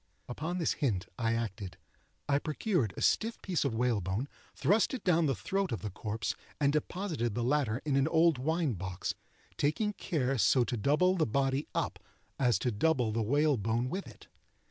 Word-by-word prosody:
Upon 160 +8 -3
this 165 - +1
hint 105 -10 -1
I 115 -1 +1
acted. 100 -6 -4 0.5
I 140 -1 +3
procured 155 - 0
a - - -2
stiff 225 +1 +2
piece 180 -4 0
of 135 -5 -1
whalebone, 110 -1 0 0.3
thrust 205 - +2
it 245 - -7
down 170 -3 +3
the 135 - +1
throat 195 - -1
of 115 - -3
the 105 - -3
corpse, 110 +3 -3 0.3
and 145 -1 +3
deposited 150 - -2
the 120 - -1
latter 130 -3 +1
in 145 -3 +1
an 140 +1 +3
old 160 -3 +4
wine 160 0 0
box—taking 125 - -3
care 135 -10 -1
so 125 +3 +4
to 120 - -2
double 150 - +2
the 160 - +2
body 135 +4 0
up - - -1 0.4
as 120 -6 +3
to 125 - -1
double 125 0 +1
the 115 +1 0
whalebone 120 -2 +1
with 195 +1 -4
it. - - -14
135 Hz, 175 wpm, -31 LUFS, 115-160 Hz, 0.5 s, old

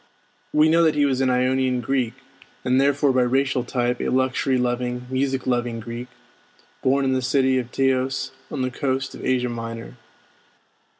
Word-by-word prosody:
We 150 +1 +4
know 165 +1 +4
that 160 -2 +3
he 145 -1 +3
was 135 -2 +1
an 130 - +2
Ionian 130 0 +1
Greek, 125 -1 -1 0.5
and 130 +1 +3
therefore 140 0 +3
by 130 - +3
racial 130 0 +1
type 120 0 -1
a - - -1
luxury 130 0 +1
loving, 125 0 -1
music 130 0 -1
loving 120 -2 -1
Greek, 120 +2 -6 0.7
born 135 +1 +2
in 130 - +2
the 130 - 0
city 130 0 +2
of 120 -1 -6
Teos 130 0 0 0.2
on 135 - -3
the 130 - -1
coast 135 -1 -2
of - - -10
Asia 125 -1 +1
Minor. 115 +1 -6
130 Hz, 170 wpm, -23 LUFS, 125-135 Hz, 0.7 s, We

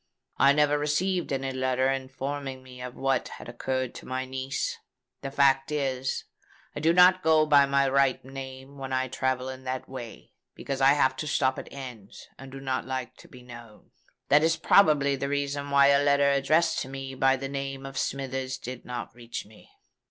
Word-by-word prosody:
I 140 - +6
never 150 0 +3
received 175 +5 0
any 135 -1 -2
letter 130 0 0
informing 135 0 -5
me 125 -1 -12
of 125 0 -7
what 135 0 0
had - - -10
occurred 130 +1 -3
to - - -11
my 130 0 -3
niece. 130 +1 -3 0.4
The 135 - -4
fact 135 0 +3
is, 135 -3 -2 0.5
I - - -3
do 160 +2 +3
not 180 +1 +6
go 160 -2 +4
by 145 -2 +5
my 140 0 +2
right 135 -1 +2
name 135 +1 -9
when 135 -1 -6
I 130 0 0
travel 130 0 -1
in 130 0 -7
that 130 0 -4
way, 125 -3 -9 0.2
because 135 -1 -4
I 135 +1 +6
have 130 -2 +2
to 155 - -4
stop 130 -2 +1
at - - -10
inns, 125 -7 -10
and 135 0 -10
do 135 - -8
not 130 -1 -3
like 130 -2 -4
to - - -15
be 125 -1 -14
known. 120 -3 -13 0.4
That 145 +1 +6
is 160 0 +2
probably 145 -7 +4
the 140 +1 -3
reason 140 0 -2
why 140 0 +5
a 140 0 +5
letter 140 0 +4
addressed 155 +4 +2
to 130 - -5
me 135 0 -6
by 135 0 +3
the 135 +1 -5
name 135 0 -5
of 135 0 -8
Smithers 135 0 -3
did 125 0 -8
not 125 -2 -6
reach 120 0 -7
me. 110 +1 -18
135 Hz, 195 wpm, -27 LUFS, 130-140 Hz, 0.5 s, I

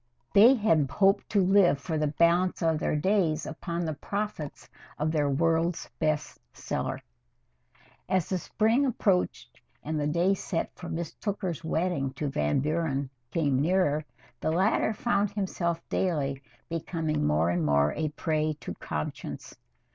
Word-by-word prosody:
They 230 +7 +8
had 165 - +2
hoped 195 +5 +2
to 200 -3 +3
live 190 -5 +5
for 160 +3 -4
the 150 -1 +1
balance 170 +4 +2
of 160 -2 +2
their - - 0
days 165 -1 +1
upon 170 +2 -4
the 160 - -2
profits 200 -1 -5 0.3
of 155 +1 0
their 150 -3 +1
World's 165 +4 0
Best 155 -1 -1
Seller. - - -3
IV - - -13 1.1
As 185 -4 +1
the 185 - 0
spring 225 - +2
approached 195 -7 0 0.2
and 155 0 -2
the 145 - 0
day 170 +5 +2
set 180 -3 -3
for 175 - -9
Miss 165 -1 -4
Tooker's 190 -6 -3
wedding 160 -4 -1
to 145 +1 -3
Van 75 - +1
Buren 145 -3 -1 0.2
came 140 -6 +1
nearer, 155 -2 +2 0.4
the - - -1
latter 190 +6 +2
found 210 -2 +1
himself 170 -4 -2
daily 140 -7 -1 0.3
becoming 165 - -2
more 80 +3 +2
and 90 -1 0
more 70 0 +3
a 155 0 -1
prey 155 0 -1
to - - -5
conscience. 75 0 -5
165 Hz, 150 wpm, -28 LUFS, 150-185 Hz, 1.1 s, They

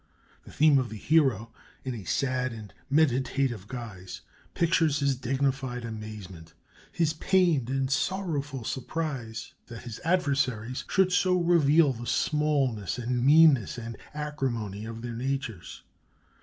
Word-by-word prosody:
The - - -12
theme 150 -1 +5
of 125 -2 -2
the 110 - -7
Hero, 130 -6 +2 0.3
in 130 - -2
a 105 -5 -8
sad 130 -2 -1
and 110 -3 -10 0.2
meditative 135 -6 +1
guise, 110 -7 -8 0.3
pictures 165 -3 +2
his 140 -1 +1
dignified 130 -1 -2
amazement, 105 -7 -8 0.4
his 165 -2 +1
pained 160 -7 +2
and 135 0 0
sorrowful 145 -6 -1
surprise 125 -3 -4
that 115 -1 -9
his 120 -3 -7
adversaries 135 -9 0
should 190 -1 +3
so 180 0 +3
reveal 165 -4 +4
the 120 0 -8
smallness 145 - 0
and 120 0 -1
meanness 145 -6 +5
and 115 -1 -6 0.2
acrimony 125 -9 -3
of 115 0 -7
their 120 -1 -4
natures. 120 -7 -4
130 Hz, 130 wpm, -28 LUFS, 115-150 Hz, 0.4 s, theme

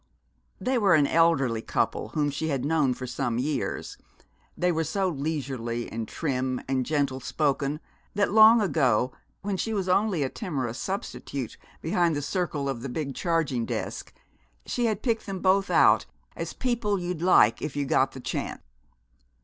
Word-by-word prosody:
They 255 +5 +1
were 195 -6 +5
an 150 -2 +4
elderly 140 -8 +3
couple - - -1
whom 145 -2 +1
she 155 +3 -3
had 135 -4 -1
known 145 -5 +2
for 130 - -6
some 125 -1 -2
years. 140 +4 -2 0.6
They 180 0 +2
were 165 -1 0
so 195 +3 0
leisurely 135 -6 -3
and 110 -1 -4
trim 130 -4 -2
and 130 -2 0
gentle 140 -4 0
spoken 145 +2 -1 0.4
that 205 0 +2
long 220 +2 +8
ago, 130 - +2 0.3
when 200 -1 -1
she 220 +3 -2
was 190 -2 -1
only 185 -3 +2
a 130 - -1
timorous 130 - -4
substitute 140 - -4 0.3
behind 170 0 +2
the 145 - -2
circle 150 -3 -2
of 135 -4 -3
the 135 - -5
big 140 +1 -3
charging 160 -7 0
desk, - - -4 0.5
she 240 - -1
had 215 -2 -2
picked 230 -3 0
them 195 -1 -3
both 190 +1 +2
out - - +5 0.3
as - - -5
people 230 -5 0
you'd 175 -2 -4
like 170 -11 +5
if 150 - -4
you 145 -1 -1
got 135 0 +2
the 135 - -8
chance. - - -4
150 Hz, 165 wpm, -27 LUFS, 130-185 Hz, 0.6 s, long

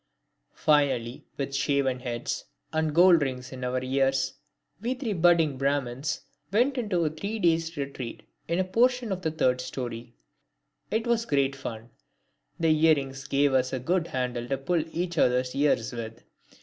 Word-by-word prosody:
Finally, 140 -5 +1
with 135 -1 -3
shaven 135 -2 +1
heads 120 -2 -4 0.3
and 155 -1 0
gold 175 -1 +7
rings 130 -2 -3
in 130 -1 -7
our 125 0 -1
ears, 135 +1 +1 0.5
we 245 +3 -1
three 245 -5 -2
budding 165 -6 +3
Brahmins 140 +1 -1 0.3
went 245 +7 +3
into 185 -8 0
a - - +2
three 200 +8 -4
days' 165 -3 +1
retreat 135 -4 -5 0.2
in 170 - 0
a 185 - +2
portion 235 +4 +2
of 185 -1 -2
the 160 - 0
third 125 -5 +1
storey. 120 -2 -6 0.7
It 225 +2 0
was 235 -1 +1
great 140 -1 +1
fun. 115 -3 -7 0.7
The 165 -1 +2
earrings 145 -4 +2
gave 140 0 +2
us 130 -1 +2
a 130 - -1
good 170 +6 0
handle 125 -3 -2
to 135 - -1
pull 160 +4 0
each 170 -1 -2
other's 125 0 +2
ears 135 -4 +1
with. 115 -1 -7
140 Hz, 160 wpm, -27 LUFS, 130-170 Hz, 0.7 s, gold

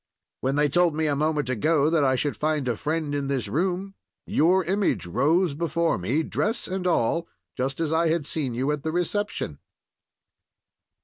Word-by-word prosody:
When 135 +1 -1
they 150 0 +3
told 170 +2 +2
me 160 0 0
a 145 -2 +1
moment 150 -1 0
ago 145 +5 +2
that 160 -3 +3
I 130 -1 +3
should 145 +3 -1
find 150 -3 -1
a 120 - +1
friend 155 +4 -2
in 140 -1 -1
this 135 -2 -1
room, 185 +4 -1 0.3
your 180 +5 +3
image 195 - 0
rose 155 - +2
before 165 - 0
me, 125 - 0
dress 220 +8 -1
and 185 -1 -2
all, 165 +1 +1 0.3
just 135 +2 -2
as 160 -1 0
I 165 +1 +3
had 160 -2 0
seen 140 -6 -2
you 130 +4 0
at 150 -1 -2
the 160 +2 -2
reception." 175 - -2
155 Hz, 180 wpm, -25 LUFS, 140-170 Hz, 0.3 s, they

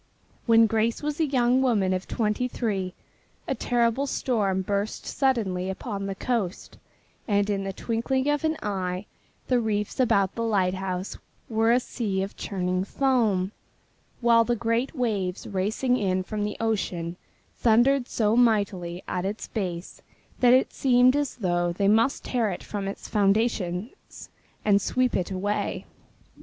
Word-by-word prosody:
When 230 0 +7
Grace 225 +4 0
was 300 +1 -2
a 320 - +2
young 255 -1 +3
woman 210 -8 +2
of 185 0 -3
twenty 225 +2 0
three 195 -7 -2 0.5
a - - 0
terrible 240 +3 +1
storm 200 -8 0
burst 200 +2 -2
suddenly 200 -9 0
upon 195 0 -4
the 195 - -3
coast 205 -4 -3 0.5
and 205 -2 +2
in 195 -1 -1
the 195 - -2
twinkling 240 +6 -1
of 295 +1 +1
an 315 0 +1
eye 185 -1 -2 0.4
the 250 -1 +2
reefs 210 -1 -2
about 200 -7 +3
the 230 - -4
lighthouse 190 -3 -1 0.3
were 225 0 +2
a 245 - +5
sea 205 -6 -2
of 195 - -6
churning 185 -1 -2
foam, 215 -6 +1 0.7
while 235 -1 +5
the 240 +1 0
great 235 +5 -1
waves 205 -8 -1
racing 220 +6 0
in 185 -3 0
from 210 +2 -3
the 210 - -4
ocean 180 -6 -2 0.4
thundered 245 +3 +4
so 215 -1 +1
mightily 200 -7 +1
at 180 - -2
its 200 +3 -4
base 180 -4 -4 0.4
that 245 -1 +5
it 255 +1 +4
seemed 255 0 +4
as 290 -2 -1
though 175 -5 0
they 195 +3 0
must 225 +6 +3
tear 235 -4 0
it 180 - -5
from 200 -2 -4
its 195 - -6
foundations 205 - -1 0.4
and 205 -1 +4
sweep 255 +5 +1
it 180 - -1
away. 200 +2 -2
215 Hz, 150 wpm, -26 LUFS, 190-245 Hz, 0.7 s, When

